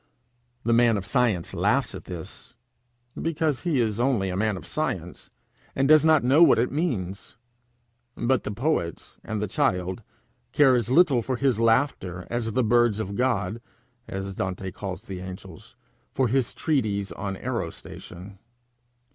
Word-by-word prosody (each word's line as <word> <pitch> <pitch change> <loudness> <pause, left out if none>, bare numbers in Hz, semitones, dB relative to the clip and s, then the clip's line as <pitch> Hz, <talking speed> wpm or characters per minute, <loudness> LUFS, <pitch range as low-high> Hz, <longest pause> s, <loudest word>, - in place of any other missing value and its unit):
The 115 - +2
man 115 -2 +4
of 100 - -5
science 110 -5 0
laughs - - +1
at - - -9
this, 85 -3 -9 0.7
because 160 -4 -1
he 165 -7 0
is 110 -2 0
only 120 -7 +1
a - - -3
man 105 0 0
of - - -10
science, 90 - -4 0.5
and 135 0 +2
does 155 0 +6
not 160 -3 +4
know 135 +6 +4
what 170 - +7
it 120 +2 +1
means; 110 - -3 0.8
but 125 +2 +1
the - - -4
poet 105 - -2
and 110 -1 -3
the - - -1
child 90 +2 -1 0.5
care 140 -3 +5
as 120 -3 +1
little 140 -3 +4
for 130 +3 -2
his 130 -3 +1
laughter 115 -6 +1
as 115 -2 -2
the 130 - +2
birds 120 -1 +3
of 100 -2 -4
God, 115 -3 0 0.5
as 95 0 -5
Dante 95 0 -4
calls 95 0 -6
the 95 -2 -7
angels, 95 -2 -10 0.4
for 130 -1 +1
his 130 0 0
treatise 105 - -1
on 100 -1 -4
aerostation. 95 +1 -7
115 Hz, 155 wpm, -25 LUFS, 95-130 Hz, 0.8 s, what